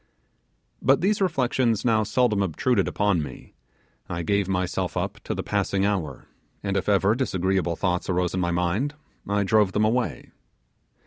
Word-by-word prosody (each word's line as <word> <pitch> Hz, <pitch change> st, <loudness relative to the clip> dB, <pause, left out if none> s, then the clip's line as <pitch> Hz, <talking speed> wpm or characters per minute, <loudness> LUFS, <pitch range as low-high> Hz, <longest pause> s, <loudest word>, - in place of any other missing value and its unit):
But 135 Hz, +4 st, +3 dB
these 205 Hz, +3 st, +1 dB
reflections 125 Hz, -, +1 dB
now 110 Hz, -2 st, +3 dB
seldom 110 Hz, -1 st, +1 dB
obtruded 100 Hz, +4 st, +1 dB
upon 100 Hz, -5 st, +1 dB
me; 75 Hz, -, -9 dB, 0.6 s
I 85 Hz, -1 st, -3 dB
gave 100 Hz, +2 st, +1 dB
myself 90 Hz, -1 st, -1 dB
up -, -, -3 dB
to -, -, -2 dB
the -, -, -3 dB
passing 100 Hz, 0 st, 0 dB
hour, 85 Hz, -10 st, -2 dB, 0.4 s
and 100 Hz, -1 st, -1 dB
if 95 Hz, -, 0 dB
ever 100 Hz, +1 st, +3 dB
disagreeable 95 Hz, -7 st, 0 dB
thoughts 90 Hz, +1 st, -1 dB
arose 90 Hz, -1 st, 0 dB
in 95 Hz, -, -1 dB
my 85 Hz, -1 st, 0 dB
mind, 90 Hz, +12 st, 0 dB, 0.3 s
I 100 Hz, 0 st, +2 dB
drove 105 Hz, -1 st, +3 dB
them 105 Hz, +1 st, +2 dB
away. 120 Hz, +2 st, -1 dB
100 Hz, 155 wpm, -25 LUFS, 90-115 Hz, 0.6 s, But